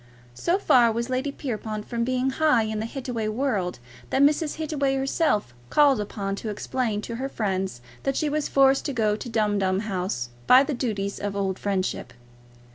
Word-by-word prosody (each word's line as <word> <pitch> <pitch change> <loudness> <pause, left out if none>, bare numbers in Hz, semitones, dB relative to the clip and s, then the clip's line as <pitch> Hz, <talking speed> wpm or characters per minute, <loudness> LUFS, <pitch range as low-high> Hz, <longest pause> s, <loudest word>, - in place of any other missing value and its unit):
So 340 - +1
far 245 - +5
was 235 +3 -3
Lady 260 +3 -1
Pierrepoint 215 -6 -4
from 235 -1 -1
being 255 +2 0
high 295 -5 +3
in 220 0 -3
the 220 - -2
Hittaway 245 -4 -4
world, 215 -6 -1 0.3
that 275 - +3
Mrs. 300 +1 +2
Hittaway 295 -3 -1
felt 270 - 0
herself 270 - 0 0.2
called 280 - +4
upon 200 -1 -3
to 220 - -5
explain 215 0 -2
to 230 - -5
her 270 +2 -3
friends 190 - -2 0.2
that 275 -1 -1
she 310 - +1
was 300 0 -1
forced 270 0 +4
to 280 - -2
go 215 -4 +1
to 240 - -7
Dumdum 205 -4 +1
House 185 - -3 0.2
by 255 +2 +8
the 285 - -2
duties 205 -6 -2
of 205 -1 -3
old 195 -2 -1
friendship. 185 -10 -2
230 Hz, 185 wpm, -25 LUFS, 205-270 Hz, 0.3 s, by